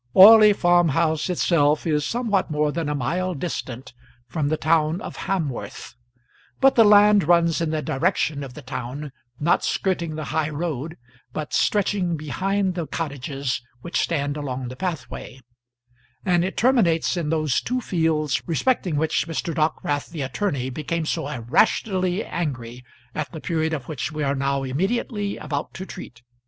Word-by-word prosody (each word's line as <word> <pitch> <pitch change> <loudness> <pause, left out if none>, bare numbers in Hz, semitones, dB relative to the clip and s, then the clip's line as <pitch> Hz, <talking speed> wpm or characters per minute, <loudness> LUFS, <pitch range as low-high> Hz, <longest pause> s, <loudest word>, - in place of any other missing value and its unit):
Orley 215 +2 +10
Farm 175 -3 +3
house 160 +3 +1
itself 155 -4 +2
is 150 -3 +1
somewhat 215 - 0
more 150 -1 +1
than 160 -1 -2
a 150 - -1
mile 175 +7 -1
distant 130 -5 -5 0.3
from 155 -4 -1
the 155 - 0
town 160 +1 +2
of - - -7
Hamworth, 160 -10 -3 0.7
but 270 0 +5
the 230 - +6
land 210 -2 +6
runs 170 -1 +3
in 165 - 0
the 155 -1 -2
direction 145 0 0
of 130 -3 -9
the - - -10
town, 130 +3 -6 0.3
not 170 +4 +2
skirting 170 -5 -1
the 155 - -4
high 155 -1 +1
road, 155 -1 -4 0.4
but 155 -1 -5
stretching 190 -4 +1
behind 190 +6 -1
the 170 -3 -4
cottages 140 -4 -3 0.2
which 170 - -2
stand 145 -3 -1
along 130 -3 -4
the 130 - -8
pathway; 160 -5 -5 0.9
and 175 -3 +3
it 190 - -3
terminates 215 -11 +3
in 165 -4 -2
those 155 -4 +1
two 255 +1 -1
fields 160 - 0
respecting 180 - 0
which 160 +2 0
Mr. 165 +1 -3
Dockwrath 155 -2 -1
the 160 -4 -4
attorney 130 -2 -2
became 160 +4 -3
so 160 -1 -2
irrationally 180 - +1
angry 125 -7 -4 0.3
at 155 -2 -4
the 160 - -7
period 160 -1 -1
of 145 -6 -4
which 150 -2 -4
we 155 -1 -3
are 140 0 +1
now 140 0 -1
immediately 200 - -1
about 145 -1 -4
to 190 - -6
treat. 125 -11 -10
160 Hz, 160 wpm, -23 LUFS, 145-180 Hz, 0.9 s, Orley